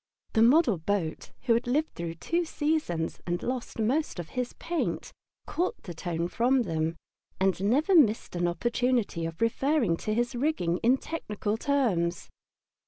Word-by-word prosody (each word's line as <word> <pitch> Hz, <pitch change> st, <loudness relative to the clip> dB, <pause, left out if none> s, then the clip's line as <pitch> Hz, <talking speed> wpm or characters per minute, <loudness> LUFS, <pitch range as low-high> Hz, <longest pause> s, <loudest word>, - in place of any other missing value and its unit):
The 220 Hz, -, +3 dB
model 240 Hz, -, +5 dB
boat, 165 Hz, -2 st, -2 dB
who 245 Hz, -3 st, +3 dB
had 235 Hz, +1 st, 0 dB
lived 300 Hz, +6 st, +1 dB
through 170 Hz, -1 st, -5 dB
two 340 Hz, -, 0 dB
seasons 295 Hz, -, -1 dB
and 175 Hz, 0 st, -1 dB
lost 250 Hz, 0 st, -3 dB
most 250 Hz, +7 st, 0 dB
of 175 Hz, -2 st, -6 dB
his 250 Hz, -1 st, -3 dB
paint, 340 Hz, -1 st, -3 dB, 0.3 s
caught 365 Hz, +7 st, -2 dB
the 175 Hz, -, -7 dB
tone 170 Hz, 0 st, -2 dB
from 250 Hz, +6 st, +2 dB
them 165 Hz, -3 st, -1 dB, 0.4 s
and 190 Hz, 0 st, +1 dB
never 280 Hz, -, +3 dB
missed 230 Hz, -, +4 dB
an 175 Hz, 0 st, +1 dB
opportunity 235 Hz, -1 st, 0 dB
of 165 Hz, +3 st, -9 dB
referring 230 Hz, -, +2 dB
to 215 Hz, +4 st, -2 dB
his 240 Hz, +2 st, 0 dB
rigging 240 Hz, -, 0 dB
in 250 Hz, +3 st, +4 dB
technical 210 Hz, -9 st, -3 dB
terms. 220 Hz, -, 0 dB
230 Hz, 155 wpm, -28 LUFS, 175-270 Hz, 0.4 s, model